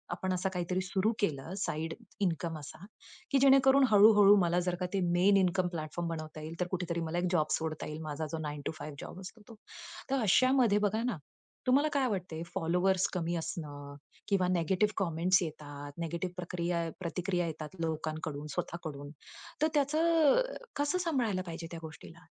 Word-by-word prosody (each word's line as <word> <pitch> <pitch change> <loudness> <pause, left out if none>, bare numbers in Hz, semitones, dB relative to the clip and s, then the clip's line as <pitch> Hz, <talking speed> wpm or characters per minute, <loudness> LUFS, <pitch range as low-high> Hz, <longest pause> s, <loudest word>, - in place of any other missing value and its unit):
आपण 185 0 -2
असा 185 +1 -1
काहीतरी 180 +1 -1
सुरू 190 +3 0
केलं 160 -3 -1
साइड 160 +2 -3 0.3
इन्कम 165 -3 -1
असा, 155 +5 -10 0.5
की 275 - +4
जेणेकरून 270 0 +6
हळू-हळू 205 -1 +8
मला 175 0 +2
जर 180 - +1
का 180 - -1
ते 195 - +1
मेन 190 +3 +4
इन्कम 185 -1 +2
प्लॅटफॉर्म 155 +2 -4
बनवता 155 -1 -6
येईल, 160 +2 -7
तर 180 - 0
कुठेतरी 175 -2 -2
मला 165 +1 -3
एक 175 +1 +1
जॉब 155 -4 +1
सोडता 160 -1 -4
येईल. 150 +1 -6
माझा 155 0 -4
जो 165 - -2
9 145 0 -5
टू - - -1
5 150 -1 -7
जॉब - - -8
असतो 195 +4 -10
तो. 230 - -11 0.5
तर 270 -1 +1
अशामध्ये 240 +1 +4
बघा 220 +3 -1
ना, 240 -7 -1 0.5
तुम्हाला 275 +4 +4
काय 275 -2 +2
वाटतंय? 180 -7 -3
फॉलोवर्स 180 +3 +2
कमी 175 -2 -1
असणं 150 -4 -6 0.3
किंवा 190 -3 +2
निगेटिव्ह 185 +4 +1
कमेंट्स 175 +3 +2
येतात, 145 -2 -7
निगेटिव्ह 170 +2 -3
प्रक्रिया 170 -1 -2
प्रतिक्रिया 180 +1 -1
येतात 155 +2 -7
लोकांकडून, 155 -2 -4
स्वतःकडून, 145 -4 -5 0.5
तर 310 - +5
त्याचं 310 - +4 0.3
कसं 290 +5 0
सांभाळायला 255 - 0
पाहिजे 165 -1 -6
त्या 170 - -6
गोष्टीला? 155 -1 -11
180 Hz, 165 wpm, -31 LUFS, 160-200 Hz, 0.5 s, हळू-हळू